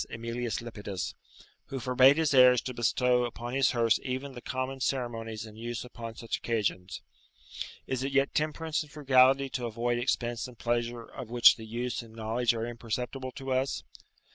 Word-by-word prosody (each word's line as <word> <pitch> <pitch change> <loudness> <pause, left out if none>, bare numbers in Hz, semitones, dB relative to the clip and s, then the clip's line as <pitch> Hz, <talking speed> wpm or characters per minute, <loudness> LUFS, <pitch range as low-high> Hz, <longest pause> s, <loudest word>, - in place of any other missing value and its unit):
Emilius 115 0 -3
Lepidus, 105 -5 -5 0.5
who 135 - -4
forbade 130 +3 +5
his 160 -3 +2
heirs 125 -1 +7
to 125 - -5
bestow 125 +1 +2
upon 120 0 -5
his 135 0 +3
hearse 115 -3 +3
even 130 +2 -4
the 125 -2 -9
common 130 +2 -3
ceremonies 115 -4 -2
in 110 -1 -12
use 120 +2 -5
upon 115 -2 -8
such 115 0 -3
occasions. 100 -5 -2 0.8
Is 130 -1 -2
it 135 +1 -2
yet 135 0 +2
temperance 155 +1 -1
and 150 -2 -9
frugality 135 -2 +4
to 125 -2 -2
avoid 120 +1 -1
expense 120 -1 -1
and 125 -2 -13
pleasure 120 0 -1
of 115 - -9
which 120 0 +7
the 110 -1 -10
use 120 +3 -3
and 115 -1 -14
knowledge 115 +2 0
are 115 0 -2
imperceptible 120 +3 -4
to 135 +1 -6
us? 130 +1 0
120 Hz, 170 wpm, -29 LUFS, 115-130 Hz, 0.8 s, heirs